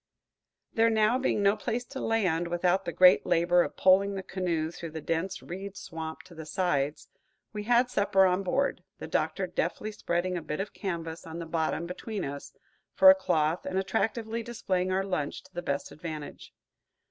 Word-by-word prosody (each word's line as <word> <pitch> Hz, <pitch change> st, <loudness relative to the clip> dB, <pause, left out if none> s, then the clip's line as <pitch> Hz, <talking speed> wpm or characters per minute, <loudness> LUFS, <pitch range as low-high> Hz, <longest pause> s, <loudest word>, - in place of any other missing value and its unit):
There 230 Hz, 0 st, +4 dB
now 220 Hz, +2 st, +3 dB
being 215 Hz, -5 st, +1 dB
no 200 Hz, +1 st, +4 dB
place 240 Hz, +2 st, -3 dB
to 265 Hz, +2 st, -7 dB
land, 185 Hz, -9 st, +1 dB
without 175 Hz, +2 st, +1 dB
the -, -, -2 dB
great 180 Hz, +1 st, +6 dB
labor 175 Hz, +1 st, +3 dB
of -, -, -3 dB
poling 195 Hz, +2 st, +4 dB
the 190 Hz, -, -4 dB
canoe 170 Hz, -5 st, -2 dB
through 170 Hz, -1 st, -7 dB
the 160 Hz, +1 st, -6 dB
dense 170 Hz, +4 st, -2 dB
reed 195 Hz, +2 st, -7 dB
swamp 160 Hz, -4 st, -7 dB
to 185 Hz, -, -15 dB
the 160 Hz, -1 st, -9 dB
sides, 150 Hz, -4 st, -1 dB, 0.5 s
we 210 Hz, -1 st, -5 dB
had 240 Hz, +2 st, +4 dB
supper 195 Hz, -1 st, +3 dB
on 185 Hz, +1 st, +2 dB
board, 275 Hz, +9 st, 0 dB
the -, -, -7 dB
Doctor -, -, -1 dB
deftly 215 Hz, -, -2 dB
spreading 180 Hz, -3 st, -1 dB
a -, -, -4 dB
bit 150 Hz, 0 st, -4 dB
of 195 Hz, +1 st, -4 dB
canvas 165 Hz, -4 st, -5 dB
on 160 Hz, 0 st, -7 dB
the 170 Hz, -, -5 dB
bottom 160 Hz, +1 st, -1 dB
between 190 Hz, +3 st, -5 dB
us, 140 Hz, 0 st, -7 dB, 0.4 s
for 285 Hz, -, +9 dB
a -, -, +5 dB
cloth, 160 Hz, -, 0 dB
and 185 Hz, 0 st, -3 dB
attractively 225 Hz, +3 st, -1 dB
displaying 185 Hz, -6 st, -2 dB
our 190 Hz, +1 st, +1 dB
lunch 180 Hz, -7 st, -3 dB
to 185 Hz, 0 st, -21 dB
the 175 Hz, -, -4 dB
best 140 Hz, -4 st, -3 dB
advantage. 155 Hz, -2 st, -8 dB
185 Hz, 185 wpm, -29 LUFS, 165-205 Hz, 0.5 s, for